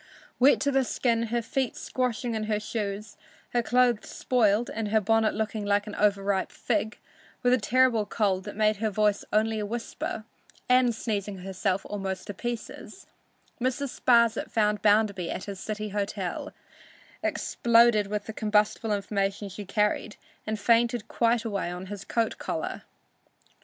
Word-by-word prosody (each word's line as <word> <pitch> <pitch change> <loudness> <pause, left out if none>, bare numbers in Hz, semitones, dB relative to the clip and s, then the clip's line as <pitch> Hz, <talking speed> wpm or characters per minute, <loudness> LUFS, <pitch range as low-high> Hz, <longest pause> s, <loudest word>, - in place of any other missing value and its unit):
Wet 265 +3 +6
to 285 - +2
the 270 -1 +3
skin, 230 -2 0
her 235 +1 -1
feet 260 +1 -1
squashing 245 -2 -2
in 215 -1 -2
her 215 -1 0
shoes, 210 -1 -4 0.4
her 240 - +3
clothes 245 -1 +2
spoiled 230 -2 +2
and 220 -1 -2
her 220 +1 +3
bonnet 220 +1 +2
looking 215 0 -2
like 205 0 +1
an 210 - -7
over 200 -1 +2
ripe 195 -1 0
fig, 220 -1 -1 0.5
with 245 0 +4
a 255 - +4
terrible 230 0 +3
cold 195 -3 0
that 205 - -7
made 215 0 +2
her 220 +1 0
voice 210 0 +1
only 220 +1 +2
a 210 - -2
whisper, 225 -1 -4 0.4
and 250 -2 +4
sneezing 205 -3 -3
herself 190 0 -1
almost 195 -2 -4
to 205 - -6
pieces, 240 +3 -6 0.6
Mrs. 260 +2 -2
Sparsit 235 -2 +4
found 210 -2 +1
Bounderby 205 -4 +3
at - - -4
his 200 -2 -7
city 215 +1 -4
hotel, 200 -2 -3 0.7
exploded 235 -3 +3
with 210 0 -3
the 220 - -6
combustible 215 +1 +1
information 200 0 -2
she 205 +2 -8
carried 210 +1 0 0.3
and 215 0 -2
fainted 230 +1 +2
quite 235 0 +1
away 200 -5 -2
on 180 +1 -6
his 200 -1 -7
coat 230 +2 -1
collar. - - -3
215 Hz, 155 wpm, -27 LUFS, 205-235 Hz, 0.7 s, Wet